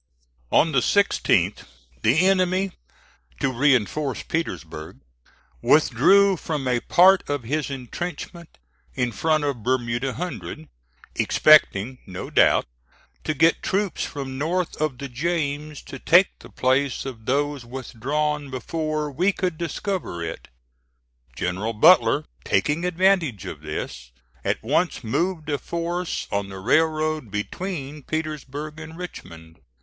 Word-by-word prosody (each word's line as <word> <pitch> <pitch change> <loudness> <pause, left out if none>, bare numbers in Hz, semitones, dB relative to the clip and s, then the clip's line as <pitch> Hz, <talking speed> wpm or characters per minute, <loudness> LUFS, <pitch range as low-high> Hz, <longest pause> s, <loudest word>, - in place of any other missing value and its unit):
On 160 - +4
the 135 - +4
16th 200 +11 +2 0.4
the 150 +11 +4
enemy, 190 0 +2 0.7
to 135 - 0
reinforce 135 +1 +1
Petersburg, 80 - -4 0.6
withdrew 180 - +5
from 150 -5 -3
a 125 -1 +2
part 185 +7 +5
of 145 -3 -1
his 150 +5 -2
intrenchment 165 +6 -6 0.4
in 125 -2 0
front 155 +7 +1
of 140 -5 -2
Bermuda 120 +1 -1
Hundred, 110 - -6 0.5
expecting, 130 -5 +4
no 90 -2 -7
doubt, - - +4 0.6
to 155 - -1
get 165 +4 +3
troops 195 -3 -1
from 135 -2 -5
north 175 +4 -1
of 155 -5 0
the 140 - -5
James 150 +1 -2
to 135 - -9
take 180 +7 +5
the - - -13
place 130 +2 0
of 120 -4 -8
those 145 0 0
withdrawn 140 +4 -3
before 155 +3 -3
we 180 +9 +2
could 185 -3 -2
discover 170 - -3
it. 80 - -6 0.9
General 95 - -2
Butler, 155 +4 +5 0.2
taking 155 +4 +1
advantage 175 - +2
of 80 -5 -7
this, 70 -5 -6 0.3
at - - -1
once - - 0
moved 165 +7 -1
a 145 - 0
force 170 +1 -3
on 100 -1 -1
the 95 - -8
railroad 155 +4 +1
between 145 - -4
Petersburg 155 0 -5
and 160 +1 -9
Richmond. 80 - -10
145 Hz, 125 wpm, -24 LUFS, 125-165 Hz, 0.9 s, withdrew